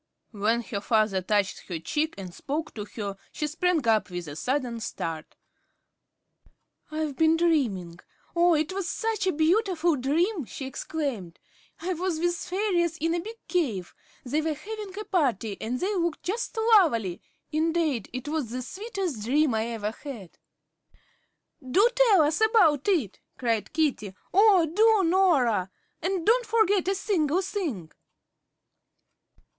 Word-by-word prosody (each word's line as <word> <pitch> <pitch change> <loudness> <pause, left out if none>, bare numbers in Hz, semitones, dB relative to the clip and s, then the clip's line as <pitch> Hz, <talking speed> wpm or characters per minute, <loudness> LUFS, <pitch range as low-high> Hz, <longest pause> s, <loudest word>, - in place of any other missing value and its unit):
When 225 +2 0
her 205 -4 -4
father 215 -3 +2
touched 200 +1 0
her 175 - -3
cheek 300 - -2
and 185 -3 -7
spoke 310 - -4
to 210 -2 -6
her, 200 -3 -4
she 300 - -3
sprang 320 -2 0
up 215 -4 +3
with 175 -2 -5
a 145 - -7
sudden 250 - -2
start. 165 -7 -5 1.5
"I've 310 -2 -3
been 320 +2 +4
dreaming. 225 - 0 0.4
Oh, 345 0 +5
it 310 +3 0
was 385 -2 -3
such 445 -4 -1
a - - +4
beautiful 345 +1 +2
dream!" 310 - 0
she 270 - -7
exclaimed. 265 - -4 0.4
"I 365 +3 -2
was 350 -1 -2
with 345 +1 0
the - - -6
fairies 355 -4 0
in 330 +1 0
a 345 - 0
big 440 +6 -7
cave. 235 - -1 0.3
They 290 +5 0
were 310 -1 -1
having 415 +3 -7
a 425 - -5
party, 255 - 0
and 245 +3 -2
they 390 +3 -1
looked 340 -3 -1
just 450 +5 -3
lovely. 330 - +3 0.3
Indade, 315 - 0
it 255 +3 -6
was 300 -6 -2
the 250 +2 -4
sweetest 385 - -4
dream 280 +3 +2
I 220 +1 0
ever 220 -3 -3
had." 225 - -10 1.2
"Do 370 - +4
tell 465 -8 +5
us 305 +6 0
about 390 - +4
it," 310 - +1 0.2
cried 230 -4 -1
Katie. 275 -11 -1 0.2
"Oh, 390 -3 +6
do, 415 +3 +4
Norah. 270 - +3 0.3
And 360 -1 -1
don't 475 +2 +3
forget 415 -4 +2
a 390 - +2
single 370 -3 +1
thing." 300 - -4
310 Hz, 150 wpm, -27 LUFS, 230-370 Hz, 1.5 s, Oh